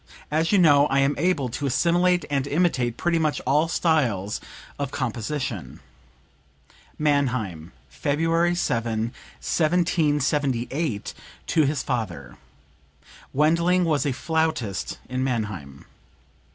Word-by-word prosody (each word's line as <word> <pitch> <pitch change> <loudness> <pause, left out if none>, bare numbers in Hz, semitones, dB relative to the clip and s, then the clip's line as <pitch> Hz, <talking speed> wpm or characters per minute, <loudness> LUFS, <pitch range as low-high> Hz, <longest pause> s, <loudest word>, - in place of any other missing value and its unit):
As 160 +2 +1
you 205 - +5
know 145 -5 +6
I 135 - 0
am 140 +1 +3
able 165 -5 +1
to 140 +5 -3
assimilate 175 +5 +2
and 140 -1 0
imitate 140 -7 +1
pretty 170 -1 +1
much 155 -2 0
all 150 +5 +2
styles 125 - 0 0.4
of 140 -2 -2
composition." 120 - -4 1.2
(Mannheim, 125 - 0 0.2
February 165 +4 +1
7, 115 -7 -1 0.3
1778, 150 - 0 0.3
to 155 -2 +2
his 140 -1 -1
father. 90 - -4 1.0
Wendling 170 +5 +3
was 150 -4 +1
a - - +1
flautist 155 - -1
in 130 0 -2
Mannheim.) 105 - -4
140 Hz, 105 wpm, -24 LUFS, 120-160 Hz, 1.2 s, know